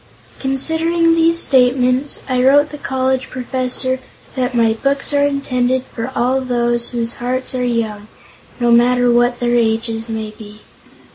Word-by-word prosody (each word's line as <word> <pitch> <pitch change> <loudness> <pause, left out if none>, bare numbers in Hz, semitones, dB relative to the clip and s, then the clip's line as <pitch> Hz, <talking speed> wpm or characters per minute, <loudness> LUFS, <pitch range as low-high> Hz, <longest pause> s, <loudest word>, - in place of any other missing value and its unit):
Considering 325 +5 +1
these 330 0 +3
statements, 255 -1 +2
I 255 -2 0
wrote 290 +3 +4
the 295 - -9
college 260 -1 -1
professor 255 0 -2 0.4
that 250 -1 -2
my 230 -2 +3
books 275 +5 0
are 285 0 +3
intended 260 -2 -1
for 235 0 -7
all 255 +3 +1
those 240 -2 -1
whose 235 -1 -3
hearts 255 +2 -2
are 255 -1 -2
young, 220 -4 -2 0.5
no 240 -1 +2
matter 245 +1 +4
what 240 +1 +2
their 240 0 0
ages 225 0 -1
may 220 -1 -4
be. 215 -1 -13
250 Hz, 145 wpm, -17 LUFS, 235-265 Hz, 0.5 s, wrote